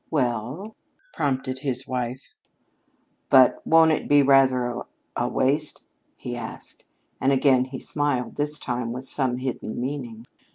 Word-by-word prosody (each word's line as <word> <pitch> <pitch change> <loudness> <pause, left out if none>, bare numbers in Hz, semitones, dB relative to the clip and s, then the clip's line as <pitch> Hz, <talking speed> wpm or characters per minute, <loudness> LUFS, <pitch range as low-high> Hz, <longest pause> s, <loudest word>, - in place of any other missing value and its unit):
"Well?" 135 - -2 0.4
prompted 130 -1 -1
his 130 -2 -2
wife. 125 0 -4 1.0
"But 130 -2 +6
won't 160 0 +6
it 155 - -1
be 145 -1 +6
rather 135 -2 +4
a 120 0 -3 0.3
a - - 0
waste?" 145 +3 0 0.3
he 120 - -6
asked. 115 -2 -7 0.4
And 135 - +3
again 135 -1 +4
he 130 0 -7
smiled, 145 -3 -1
this 150 +1 -1
time 120 -3 -3
with 125 +1 -6
some 130 -3 0
hidden 130 -3 -4
meaning. 120 -4 -5
130 Hz, 135 wpm, -24 LUFS, 125-145 Hz, 1.0 s, But